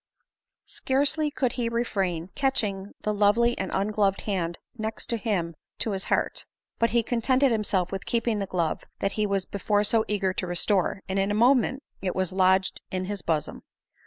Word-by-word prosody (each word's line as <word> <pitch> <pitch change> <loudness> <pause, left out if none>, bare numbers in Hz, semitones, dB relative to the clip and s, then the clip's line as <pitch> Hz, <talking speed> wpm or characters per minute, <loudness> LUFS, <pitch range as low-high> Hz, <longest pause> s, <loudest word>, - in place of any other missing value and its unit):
Scarcely 290 +3 +1
could 260 -4 0
he 235 -1 -1
refrain 190 -7 -1
catching 205 -8 -1
the 210 - 0
lovely 210 +4 +3
and 190 - -3
ungloved 200 0 +1
hand 175 -5 -2 0.2
next 220 0 -4
him 205 -8 -1 0.2
to 220 - -1
his 190 -1 -3
heart; - - 0 0.4
but 230 - +3
be 235 -1 +3
contented 255 +3 +2
himself 205 -5 +1
with 195 0 -5
keeping 230 -2 0
the 195 - -2
glove 170 -4 -1 0.2
that 195 - -1
he 210 0 0
was 195 -2 0
before 205 +1 0
so 220 +1 +3
eager 195 -3 0
to 185 - -3
restore, 185 +2 +1
and 190 +1 -1
in 195 +1 +1
a 205 - 0
moment 260 +3 +3 0.2
it 185 -1 -2
was 185 -1 -1
lodged 190 0 +2
in 185 0 -2
his 200 0 -4
bosom. 160 -3 -1
205 Hz, 175 wpm, -26 LUFS, 190-230 Hz, 0.4 s, lovely